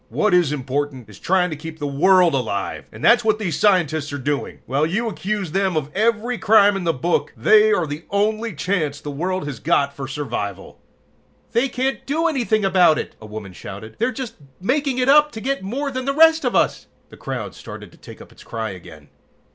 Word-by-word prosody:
What 215 -3 +1
is 175 -5 +4
important 135 -3 -3
is 105 - -14
trying 180 -1 +1
to - - -3
keep 160 +2 -8
the 145 - -4
world 175 +4 +4
alive, 110 -7 -2
and - - -6
that's 240 0 +6
what 215 -1 +2
these 185 -8 -3
scientists 160 -7 +2
are 145 - -3
doing. 145 +1 -3
"While 140 +4 0
you 215 +8 -1
accuse 200 -4 -3
them 190 -1 0
of 150 -1 -3
every 230 +3 0
crime 205 -2 +5
in 190 -3 -3
the 165 - +3
book, 165 +4 -1
they 435 0 +5
are 415 - +2
the 150 +2 -7
only 215 +1 0
chance 155 -4 -1
the 145 - -6
world 180 +4 -2
has 140 -6 -6
got 140 0 +1
for 135 -1 -6
survival!" 120 -9 -5 0.7
"They 245 +4 +1
can't 260 +2 -2
do 315 +4 0
anything 235 -9 +1
about 180 -4 +4
it!" - - -5
a 110 - -10
woman 105 -3 -8
shouted. 100 +4 -9
"They're 240 +3 +1
just 260 -3 -7 0.2
making 260 +6 0
it 250 0 +1
up 300 +2 +6
to 220 - -6
get 275 +4 -2
more 270 +9 -3
than 255 -1 -4
the 275 0 -1
rest 320 +1 +5
of - - 0
us!" - - +1 0.2
The - - -13
crowd - - -5
started - - -10
to - - -20
take - - -12
up - - -19
its - - -16
cry 110 -2 -4
again. 80 -5 -12
185 Hz, 210 wpm, -21 LUFS, 145-230 Hz, 0.7 s, that's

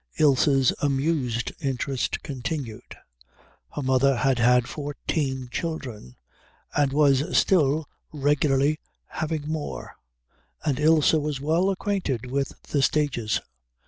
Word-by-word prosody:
Ilse's 135 -2 +4
amused 135 -4 0
interest 135 -2 -2
continued. 135 -4 -5 0.8
Her 145 - -3
mother 130 +1 +3
had 130 +2 +1
had 125 +1 +4
fourteen 140 -2 -3
children 125 - -5 0.6
and 145 -2 +2
was 140 0 +3
still 155 -4 +3 0.2
regularly 145 0 +2 0.3
having 155 -2 -4
more, 155 -1 -5 0.7
and 145 -3 0
Ilse 155 0 +4
was 150 -3 0
well 165 +7 +2
acquainted 180 - -2
with 135 0 -2
the 145 - -1
stages. 125 -6 +1
140 Hz, 105 wpm, -25 LUFS, 130-155 Hz, 0.8 s, Ilse's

